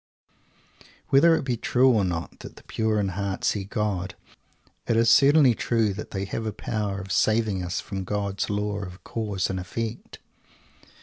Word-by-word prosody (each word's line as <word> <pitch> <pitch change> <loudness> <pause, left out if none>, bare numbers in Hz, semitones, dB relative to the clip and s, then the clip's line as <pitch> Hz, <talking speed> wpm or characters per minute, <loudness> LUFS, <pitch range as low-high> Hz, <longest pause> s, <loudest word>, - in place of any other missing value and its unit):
Whether 165 +5 +6
it - - -2
be 125 -3 -1
true 130 +3 +3
or 110 -4 +2
not 85 -2 -4
that - - -10
the - - -15
Pure 110 -1 -1
in 100 -2 0
Heart 95 +1 -3
see 100 -2 0
God, 100 -2 -2 0.7
it 115 - +2
is 115 0 +4
certainly 140 0 +6
true 110 -2 0
that 110 - -7
they 95 0 -3
have 110 +3 -4
a - - -1
power 105 -2 -3
of 95 0 -7
saving 110 -3 +2
us 90 0 -2
from 95 -2 -5
God's 100 0 -2
Law 105 0 -1
of 90 -2 -8
Cause 105 -4 -2
and 95 - -3
Effect! 115 +5 -5
105 Hz, 175 wpm, -25 LUFS, 95-115 Hz, 0.7 s, Whether